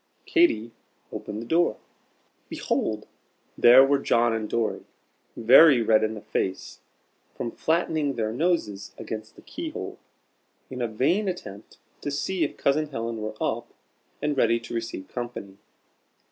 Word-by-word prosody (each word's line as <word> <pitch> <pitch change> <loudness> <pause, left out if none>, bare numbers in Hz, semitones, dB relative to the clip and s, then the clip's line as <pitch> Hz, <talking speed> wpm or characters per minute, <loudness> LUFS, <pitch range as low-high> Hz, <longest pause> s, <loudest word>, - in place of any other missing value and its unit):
Katy 340 - +2 0.4
opened 105 +2 -6
the - - -9
door. 165 -3 +2 0.7
Behold! 110 -1 -2 0.5
there 125 +3 +8
were 140 0 +2
John 120 -3 +2
and 110 -1 -3
Dorry, 115 -2 -1 0.5
very 130 +2 +7
red 110 -1 +4
in 110 0 -1
the 105 - -8
face 95 -1 -3 0.6
from 115 - -4
flattening 160 -4 0
their 110 -1 -2
noses 120 - -1
against 110 0 -7
the - - -16
key 330 0 -6
hole, - - -7 0.7
in 125 -1 -5
a 120 - +1
vain 140 - +1
attempt 105 - -7 0.2
to - - -3
see 165 +5 -1
if 145 - -3
Cousin 150 +2 +1
Helen 115 -4 -4
were 110 0 -5
up - - -3 0.5
and 150 -1 0
ready 115 -3 +3
to 115 - -9
receive 115 -5 -4
company. 120 -6 -7
120 Hz, 145 wpm, -26 LUFS, 110-150 Hz, 0.7 s, there